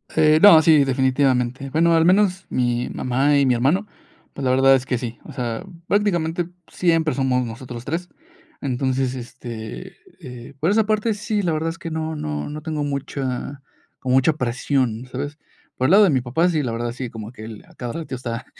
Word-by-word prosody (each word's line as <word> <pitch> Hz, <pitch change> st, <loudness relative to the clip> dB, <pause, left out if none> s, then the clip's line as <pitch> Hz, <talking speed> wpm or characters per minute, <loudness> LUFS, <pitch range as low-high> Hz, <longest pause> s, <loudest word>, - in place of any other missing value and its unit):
Eh, 155 Hz, 0 st, +5 dB
no, 195 Hz, -6 st, +9 dB
sí, 155 Hz, -2 st, +5 dB
definitivamente. 130 Hz, -1 st, +1 dB
Bueno, 165 Hz, +4 st, +3 dB
al 165 Hz, 0 st, +4 dB
menos 190 Hz, 0 st, +3 dB
mi 120 Hz, -1 st, 0 dB
mamá 135 Hz, +4 st, +1 dB
y 140 Hz, -, +3 dB
mi 130 Hz, -, +3 dB
hermano, 145 Hz, -, +1 dB, 0.5 s
pues, 140 Hz, -, -6 dB
la 130 Hz, -, +3 dB
verdad 135 Hz, +1 st, +5 dB
es 130 Hz, -1 st, -2 dB
que 125 Hz, -1 st, -1 dB
sí. 120 Hz, -1 st, -6 dB
O -, -, -11 dB
sea, 120 Hz, +2 st, -4 dB, 0.2 s
prácticamente 175 Hz, -4 st, 0 dB, 0.2 s
siempre 165 Hz, -3 st, +1 dB
somos 130 Hz, -2 st, +1 dB
nosotros 120 Hz, +1 st, -8 dB
3 170 Hz, +4 st, -3 dB, 0.5 s
Entonces, 130 Hz, -1 st, -1 dB
este, 115 Hz, -, -8 dB, 0.2 s
eh, 125 Hz, +1 st, -10 dB
por 160 Hz, -, +1 dB
esa 215 Hz, +1 st, +3 dB
parte 215 Hz, +1 st, +1 dB
sí, 210 Hz, 0 st, -2 dB
la 175 Hz, -4 st, 0 dB
verdad 160 Hz, +1 st, -1 dB
es 165 Hz, -, -6 dB
que 170 Hz, -, -6 dB
no 160 Hz, 0 st, -3 dB
no 75 Hz, -, -4 dB
no 150 Hz, +1 st, -6 dB
tengo 155 Hz, -1 st, -3 dB
mucha, 140 Hz, -1 st, -4 dB, 0.4 s
como 130 Hz, 0 st, 0 dB
mucha 135 Hz, +4 st, +4 dB
presión, 125 Hz, -2 st, -1 dB
¿sabes? 145 Hz, +3 st, -5 dB, 0.4 s
Por 130 Hz, -, 0 dB
el 140 Hz, -, +3 dB
lado 205 Hz, +2 st, +7 dB
de 195 Hz, -, +4 dB
mi 130 Hz, -3 st, +2 dB
papá, 130 Hz, +8 st, +1 dB
sí, 160 Hz, -3 st, 0 dB
la 125 Hz, -5 st, -2 dB
verdad 120 Hz, +1 st, -3 dB
sí, 125 Hz, 0 st, -6 dB
como 110 Hz, -1 st, -8 dB
que 110 Hz, -, -11 dB
el, 110 Hz, -1 st, -10 dB
a -, -, -19 dB
cada 120 Hz, -2 st, -6 dB
rato 160 Hz, -3 st, -6 dB
está 125 Hz, -1 st, -5 dB
135 Hz, 200 wpm, -22 LUFS, 125-160 Hz, 0.5 s, no